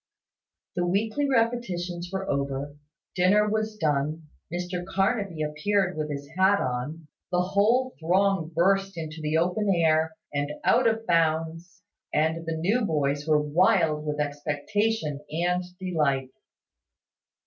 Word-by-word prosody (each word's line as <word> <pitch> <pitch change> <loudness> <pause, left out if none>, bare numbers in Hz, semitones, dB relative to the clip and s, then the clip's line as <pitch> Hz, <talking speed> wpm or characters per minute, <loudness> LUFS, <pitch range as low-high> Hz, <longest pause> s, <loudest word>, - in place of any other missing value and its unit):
The 175 - 0
weekly 215 +10 0
repetitions 185 -8 -1
were 195 0 -3
over, 140 +1 -2 0.4
dinner 195 +3 +4
was 215 0 -1
done, 150 -1 -1 0.2
Mr 180 +1 -3
Carnaby 195 -3 -1
appeared 185 +5 0
with 155 -1 -3
his 140 -1 -5
hat 190 +2 +4
on, 135 +5 -3 0.2
the 180 0 +2
whole 220 +8 +2
throng 185 0 +2
burst 195 +3 +1
into 160 -1 -6
the 155 +1 0
open 180 +5 +1
air, 160 -3 +2 0.2
and 145 +1 -1
out 245 0 +4
of 225 0 0
bounds, 165 +1 0 0.3
and 160 +2 0
the 165 -1 -2
new 205 +9 +1
boys 145 -4 0
were 155 -1 +4
wild 160 0 +2
with 150 -1 -3
expectation 150 +4 -1
and 175 +3 0 0.2
delight. 145 -8 0
175 Hz, 125 wpm, -26 LUFS, 150-195 Hz, 0.4 s, dinner